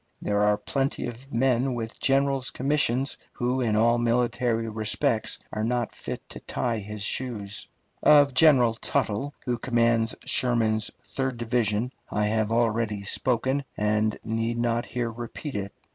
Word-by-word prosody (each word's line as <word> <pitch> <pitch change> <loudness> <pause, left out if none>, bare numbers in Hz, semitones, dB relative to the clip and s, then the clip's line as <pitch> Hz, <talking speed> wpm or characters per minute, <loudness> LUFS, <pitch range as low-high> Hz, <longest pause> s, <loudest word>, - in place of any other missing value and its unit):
There 105 0 0
are 105 0 +3
plenty 135 +6 -2
of 125 +3 -8
men 125 +1 +1
with 115 -1 -5
generals' 135 0 +2
commissions 135 -1 0 0.2
who 125 +2 -1
in 110 -4 +1
all 115 +2 +4
military 120 -1 +1
respects 110 +2 0 0.2
are 110 - -2
not 120 0 -1
fit - - -7
to - - -7
tie 115 -3 -2
his 105 0 -6
shoes. 105 -4 -2 0.3
Of 145 -2 +6
General 130 -6 +5
Tuttle, 115 +4 -2
who 120 -2 -1
commands 115 -2 +2
Sherman's 110 -3 +2
third 130 -2 -3
division, 115 0 0 0.2
I 105 0 0
have 110 0 0
already 115 -3 +1
spoken, 130 +6 0
and 105 +1 +1
need 115 +1 -1
not 120 0 0
here 120 -2 -2
repeat 120 +5 -7
it. 100 -1 -3
120 Hz, 145 wpm, -26 LUFS, 110-130 Hz, 0.3 s, Of